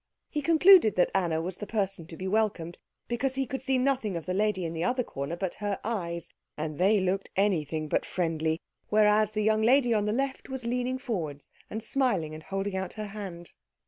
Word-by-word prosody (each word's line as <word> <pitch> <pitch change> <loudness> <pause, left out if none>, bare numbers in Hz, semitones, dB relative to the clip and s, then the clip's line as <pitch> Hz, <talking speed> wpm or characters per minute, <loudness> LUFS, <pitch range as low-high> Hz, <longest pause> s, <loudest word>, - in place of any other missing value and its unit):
He 300 - -1
concluded 335 - +6
that 180 - +3
Anna 170 -4 +1
was 180 +1 -4
the 210 - -6
person 195 -6 -1
to 165 - -9
be 190 - -4
welcomed 190 -5 0 0.3
because 255 +3 -1
he 270 0 0
could 260 +1 -5
see 265 0 +2
nothing 255 -8 0
of 165 - -7
the 185 - -2
lady 200 -2 +1
in 165 - -3
the 165 0 -2
other 250 +7 +1
corner 140 -4 -5
but 185 0 -3
her 205 -2 -1
eyes, 170 -6 -2 0.3
and 155 0 -4
they 200 +3 +4
looked 190 +1 -1
anything 160 -6 0
but - - +1
friendly; 160 -2 -1 0.3
whereas 215 0 +4
the 215 0 0
young 215 0 +3
lady 245 +1 +4
on 210 -2 +1
the 210 - 0
left 270 +4 -2
was 265 -2 -4
leaning 250 +2 -1
forward 170 - -4 0.3
and 220 0 -4
smiling 225 - 0
and 155 - -8
holding 195 +3 -3
out 190 -1 -3
her 215 -1 -5
hand. 190 -5 -7
205 Hz, 210 wpm, -28 LUFS, 170-235 Hz, 0.3 s, concluded